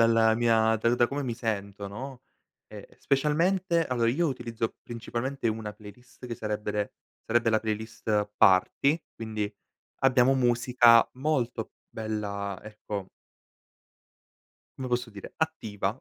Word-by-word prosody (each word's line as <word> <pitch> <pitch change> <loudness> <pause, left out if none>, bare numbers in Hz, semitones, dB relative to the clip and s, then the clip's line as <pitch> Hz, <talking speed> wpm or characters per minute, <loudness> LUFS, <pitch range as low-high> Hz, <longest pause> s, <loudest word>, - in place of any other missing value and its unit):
dalla 115 -1 +5
mia 115 -1 +3
da 115 +2 +2
da 120 -1 +4
come 140 +2 -3
mi 120 -3 -2
sento, 100 -3 -3
no? 125 +5 -7 0.5
Ehm, - - -8
specialmente 165 +5 +2
allora, 120 -2 +1
io 160 +9 +2
utilizzo 115 -5 -3
principalmente 120 +3 -4
una 110 -1 -4
playlist 120 +4 -13
che 120 - -4
sarebbe 105 -1 -3
re 105 -1 -2 0.3
sarebbe 120 0 +2
la 110 -1 +3
playlist 110 -1 -2
party, 140 - +4
quindi 110 -2 -4 0.5
abbiamo 130 0 +5
musica 120 -2 +5
molto 125 -5 -1 0.2
bella, 100 -3 -4
ecco 105 -2 -6 1.7
come 130 -1 -4
posso 120 0 0
dire, 100 -1 -10
attiva, 110 -10 -2
115 Hz, 125 wpm, -28 LUFS, 105-130 Hz, 1.7 s, dalla